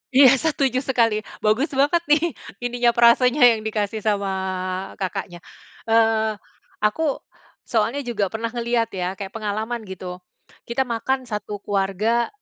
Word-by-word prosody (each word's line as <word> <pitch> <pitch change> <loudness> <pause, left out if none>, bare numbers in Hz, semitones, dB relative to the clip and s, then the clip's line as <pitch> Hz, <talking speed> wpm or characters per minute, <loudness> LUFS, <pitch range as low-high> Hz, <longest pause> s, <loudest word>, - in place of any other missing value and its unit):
Iya, 270 -1 +8
setuju 275 -4 +1
sekali, 230 -5 +1 0.2
bagus 220 +8 +1
banget 290 +5 +2
nih, 320 +2 +3 0.2
ininya 245 0 +1
frasanya 245 +3 +5
yang 225 -2 +2
dikasih 215 -1 -2
sama 200 -2 0 0.7
Kakaknya. 185 -2 -4 0.5
Eee, 225 -1 +3 0.5
aku, 280 +7 +1 0.5
soalnya 235 +5 0
juga 215 -5 -1
pernah 225 +3 -4
ngeliat 235 -1 -1
ya, 185 0 -3
kayak 195 0 -7
pengalaman, 220 +2 -3
gitu. 185 -1 -7 0.5
Kita 235 +3 0
makan 260 +2 -2
satu 210 -3 -6
keluarga, 205 +4 0
225 Hz, 125 wpm, -22 LUFS, 210-250 Hz, 0.7 s, Iya